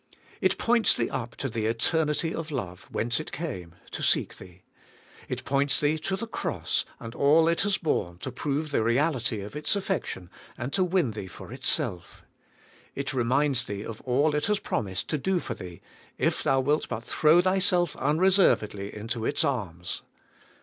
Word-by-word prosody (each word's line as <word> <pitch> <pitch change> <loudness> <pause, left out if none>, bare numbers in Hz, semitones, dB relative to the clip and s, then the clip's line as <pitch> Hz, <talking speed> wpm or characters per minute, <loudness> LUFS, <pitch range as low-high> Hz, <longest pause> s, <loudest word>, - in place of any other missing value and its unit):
It - - +2
points 235 -1 +4
thee 115 - 0
up 120 -3 -4
to 135 - -3
the 110 -3 -2
eternity 150 +7 +1
of 165 0 -4
love 95 - -5
whence 120 +5 0
it 155 - -6
came 90 - -5 0.2
to - - -4
seek - - +2
thee. 90 -1 -14 0.7
It - - -4
points 140 +1 +2
thee 150 +2 +2
to 190 +5 -1
the 220 +4 -4
Cross, 225 - -1
and 115 0 -7
all 155 +5 +5
it 170 0 +2
has 200 -1 +1
borne 90 - -1
to 130 - -5
prove 145 +4 -2
the 140 - +2
reality 120 -2 +1
of 105 +7 -8
its 150 +7 +1
affection, 185 - -3 0.3
and 125 +4 -4
to 190 - +3
win 180 -8 +2
thee 105 -3 -6
for 85 - -10
itself. 90 -2 -1 0.7
It 140 0 -3
reminds 130 +1 +2
thee 100 0 -4
of 115 -1 -7
all 140 +4 +2
it 150 +3 +1
has 210 0 +2
promised 95 - -2
to 150 - 0
do 190 +6 +1
for 125 - -4
thee, 90 -6 -9 0.4
if - - +1
thou 135 0 +3
wilt 145 +4 +1
but 110 - -3
throw 155 +7 +4
thyself 185 -1 +2
unreservedly 150 - +3
into 110 +2 -4
its 145 - +1
arms. 90 - -2
135 Hz, 175 wpm, -27 LUFS, 110-160 Hz, 0.7 s, all